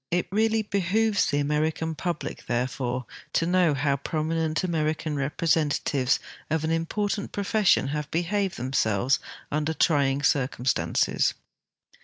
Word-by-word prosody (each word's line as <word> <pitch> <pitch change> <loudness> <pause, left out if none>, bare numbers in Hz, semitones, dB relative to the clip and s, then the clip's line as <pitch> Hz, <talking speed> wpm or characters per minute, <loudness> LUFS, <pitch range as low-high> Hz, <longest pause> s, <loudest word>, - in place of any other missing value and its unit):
It 175 +1 0
really 220 +2 +2
behooves 205 +2 +1
the 145 - 0
American 155 +2 0
public 165 +1 -4
therefore 125 0 -1 0.3
to 165 - +2
know 175 -3 +3
how 140 +1 +1
prominent 155 +2 -1
American 155 -3 -1
representatives 145 -2 +1 0.3
of 160 0 0
an 160 - 0
important 200 +5 -1
pro 200 - -3
fession 200 -9 +3
have 150 0 -3
behaved 185 +3 -1
themselves 125 -1 +1 0.3
under 150 +2 -1
trying 140 -4 +2
circumstances. 125 - +1
155 Hz, 120 wpm, -26 LUFS, 140-175 Hz, 0.3 s, know